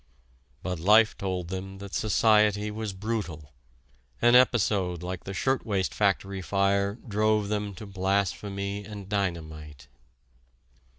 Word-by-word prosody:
But 90 Hz, -2 st, -3 dB
life 105 Hz, +5 st, +5 dB
told 90 Hz, -3 st, -3 dB
them 95 Hz, +1 st, -6 dB
that 100 Hz, 0 st, -9 dB
society 105 Hz, -1 st, +3 dB
was 110 Hz, -1 st, -4 dB
brutal: 95 Hz, -8 st, -5 dB, 0.7 s
an 120 Hz, 0 st, +4 dB
episode 100 Hz, -8 st, +3 dB
like 90 Hz, 0 st, -5 dB
the 95 Hz, -, -5 dB
shirtwaist 110 Hz, -8 st, 0 dB
factory 100 Hz, -1 st, 0 dB
fire 100 Hz, +1 st, +1 dB
drove 105 Hz, -1 st, +1 dB
them 105 Hz, -2 st, -2 dB
to 105 Hz, -, -9 dB
blasphemy 100 Hz, +1 st, -2 dB
and 100 Hz, -1 st, -9 dB
dynamite. 80 Hz, -8 st, -4 dB
100 Hz, 115 wpm, -27 LUFS, 95-105 Hz, 0.7 s, life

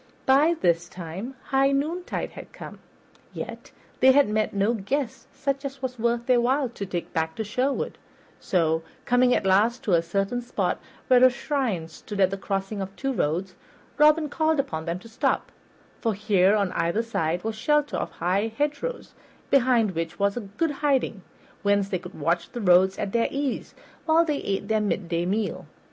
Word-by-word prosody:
By 290 Hz, +6 st, +5 dB
this 175 Hz, -1 st, +1 dB
time 185 Hz, +9 st, -7 dB
high 270 Hz, 0 st, +3 dB
noontide 315 Hz, +6 st, -2 dB
had -, -, -11 dB
come, -, -, -10 dB, 0.5 s
yet -, -, -7 dB, 0.3 s
they 265 Hz, 0 st, +7 dB
had 285 Hz, +1 st, +5 dB
met 215 Hz, 0 st, 0 dB
no 200 Hz, +3 st, +1 dB
guest 235 Hz, +3 st, -3 dB
such 275 Hz, 0 st, -2 dB
as 275 Hz, -1 st, -5 dB
was 250 Hz, -2 st, -4 dB
worth 235 Hz, +1 st, 0 dB
their 245 Hz, -1 st, +4 dB
while 260 Hz, +2 st, +1 dB
to 200 Hz, -4 st, -6 dB
take 175 Hz, -2 st, -4 dB
back 160 Hz, 0 st, -1 dB
to 220 Hz, -, -2 dB
Sherwood; 255 Hz, +6 st, -1 dB, 0.4 s
so, 160 Hz, -3 st, +1 dB, 0.2 s
coming 245 Hz, 0 st, +4 dB
at -, -, -1 dB
last 210 Hz, +6 st, +3 dB
to 200 Hz, -, +1 dB
a 170 Hz, -, +5 dB
certain 195 Hz, +8 st, -1 dB
spot 240 Hz, -, -1 dB, 0.3 s
where 255 Hz, -1 st, +6 dB
a 255 Hz, -, +9 dB
shrine 245 Hz, -, -2 dB
stood 200 Hz, +5 st, -8 dB
at 190 Hz, -1 st, +4 dB
the 195 Hz, -, -2 dB
crossing 195 Hz, +1 st, -3 dB
of 195 Hz, +1 st, -6 dB
two 270 Hz, 0 st, -2 dB
roads, 180 Hz, 0 st, -1 dB, 0.5 s
Robin 305 Hz, +1 st, +5 dB
called 315 Hz, +1 st, +1 dB
upon 260 Hz, -, -2 dB
them 170 Hz, +1 st, -2 dB
to 185 Hz, -, -13 dB
stop, 225 Hz, -, -1 dB, 0.5 s
for 225 Hz, -3 st, 0 dB
here 200 Hz, -1 st, +3 dB
on 200 Hz, -3 st, +1 dB
either 170 Hz, +7 st, 0 dB
side 175 Hz, -7 st, -1 dB
was 220 Hz, 0 st, -2 dB
shelter 295 Hz, +6 st, +1 dB
of -, -, -2 dB
high 195 Hz, +6 st, 0 dB
hedgerows, 295 Hz, +12 st, -2 dB, 0.4 s
behind 245 Hz, -6 st, +4 dB
which 165 Hz, -1 st, -4 dB
was 200 Hz, 0 st, +1 dB, 0.2 s
good 330 Hz, -2 st, +1 dB
hiding, 270 Hz, -8 st, +1 dB, 0.4 s
whence 200 Hz, -1 st, +2 dB
they 185 Hz, -, -1 dB
could 180 Hz, -1 st, -11 dB
watch 170 Hz, +3 st, 0 dB
the 240 Hz, -, -4 dB
roads 190 Hz, 0 st, +5 dB
at 195 Hz, -, -3 dB
their 230 Hz, +1 st, +2 dB
ease, 275 Hz, -2 st, -3 dB, 0.3 s
while 325 Hz, +1 st, +5 dB
they 300 Hz, -3 st, 0 dB
ate 200 Hz, -3 st, -2 dB
their 220 Hz, 0 st, +2 dB
midday 175 Hz, -4 st, -1 dB
meal. 205 Hz, +2 st, -2 dB
220 Hz, 180 wpm, -25 LUFS, 190-270 Hz, 0.5 s, a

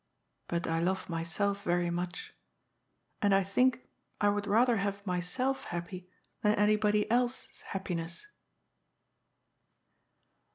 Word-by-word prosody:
But 170 Hz, +1 st, -1 dB
I 165 Hz, 0 st, 0 dB
love 185 Hz, +3 st, -1 dB
myself 195 Hz, +5 st, -1 dB
very 175 Hz, -2 st, +1 dB
much. 175 Hz, +1 st, -4 dB, 0.9 s
And 200 Hz, -1 st, +4 dB
I 195 Hz, -, +4 dB
think 250 Hz, +6 st, +2 dB, 0.3 s
I 205 Hz, -, +4 dB
would 205 Hz, 0 st, -1 dB
rather 230 Hz, +3 st, +4 dB
have 200 Hz, 0 st, -2 dB
myself 195 Hz, +9 st, -1 dB
happy 180 Hz, +1 st, -6 dB, 0.3 s
than 210 Hz, 0 st, +3 dB
any 210 Hz, +1 st, +4 dB
body 210 Hz, 0 st, +2 dB
else's 245 Hz, +1 st, 0 dB
happiness." 175 Hz, -, -4 dB
200 Hz, 115 wpm, -31 LUFS, 175-210 Hz, 0.9 s, And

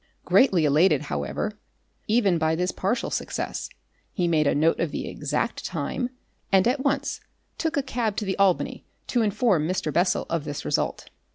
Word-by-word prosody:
Greatly 190 Hz, -, +4 dB
elated, 150 Hz, +6 st, +4 dB
however, -, -, -3 dB, 0.5 s
even 210 Hz, -6 st, +3 dB
by 160 Hz, 0 st, +2 dB
this 180 Hz, +2 st, 0 dB
partial 195 Hz, +6 st, -1 dB
success, -, -, -3 dB, 0.4 s
he 180 Hz, -4 st, 0 dB
made 155 Hz, -3 st, +2 dB
a -, -, +2 dB
note 160 Hz, +3 st, +2 dB
of 170 Hz, -, 0 dB
the -, -, -4 dB
exact -, -, -2 dB
time, 245 Hz, -1 st, -2 dB, 0.4 s
and 190 Hz, +2 st, +5 dB
at 265 Hz, +2 st, +1 dB
once 280 Hz, 0 st, -1 dB, 0.4 s
took 320 Hz, -1 st, -1 dB
a 285 Hz, -, +1 dB
cab 235 Hz, -5 st, -1 dB
to 210 Hz, -, -2 dB
the 190 Hz, -, -1 dB
Albany 195 Hz, -3 st, +2 dB, 0.2 s
to 245 Hz, -, +1 dB
inform 205 Hz, -6 st, +2 dB
Mr. 180 Hz, -4 st, -1 dB
Bessel 180 Hz, +2 st, +2 dB
of 165 Hz, -3 st, -1 dB
this 145 Hz, -1 st, -5 dB
result. -, -, -1 dB
190 Hz, 170 wpm, -25 LUFS, 165-235 Hz, 0.5 s, and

